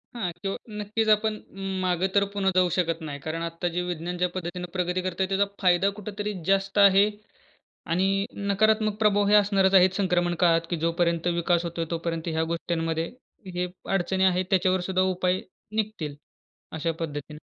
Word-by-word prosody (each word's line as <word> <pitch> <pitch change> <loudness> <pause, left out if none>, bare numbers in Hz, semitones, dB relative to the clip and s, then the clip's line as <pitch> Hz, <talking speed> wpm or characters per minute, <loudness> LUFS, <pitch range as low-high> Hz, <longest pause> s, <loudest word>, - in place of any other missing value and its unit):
हां. 215 -7 -2
किंवा 195 -1 -2 0.2
नक्कीच, 215 +2 -1
आपण 215 +1 +3 0.5
मागे 180 0 +1
तर 200 - +5
पुन्हा 195 -1 +1
जाऊ 185 -1 +4
शकत 165 -2 0
नाही. 140 - -6
कारण 160 +1 -3
आत्ता 170 +1 -3
जे 180 - +1
विज्ञान 175 +1 -4
ज्या 180 +1 +2
पद्धतीने 180 0 -5
प्रगती 180 0 -1
करत 185 0 -3
आहे 190 - +2
त्याचा 195 +1 +2 0.2
फायदा 180 +1 +4
कुठेतरी 210 +1 -4
जास्त 195 +1 +1
आहे. 200 0 +7 0.9
आणि 195 +3 +1 0.2
नकारात्मक 215 +1 +2
प्रभाव 205 -2 +3
हे 210 - +4
असणारचं 195 -2 +4
आहे 185 0 +7
संक्रमण 175 -3 +1
काळात 165 -1 +3
की 175 - 0
जोपर्यंत 170 0 +1
विकास 170 0 +1
होतोय, 170 -1 -3
तोपर्यंत 165 0 -3
ह्या 160 0 0
गोष्टींमध्ये 165 -1 -2 0.5
हे 180 0 -1 0.3
अडचणी 190 +1 +1
आहेत. 185 0 +3
त्याच्यावर 185 -1 +3
सुद्धा 185 0 +2
उपाय 180 +1 +1 0.3
निघतील, 210 -9 -2 0.6
अशा 165 +1 -1
पद्धतीने. 150 -1 -5
180 Hz, 165 wpm, -26 LUFS, 170-195 Hz, 0.9 s, आहे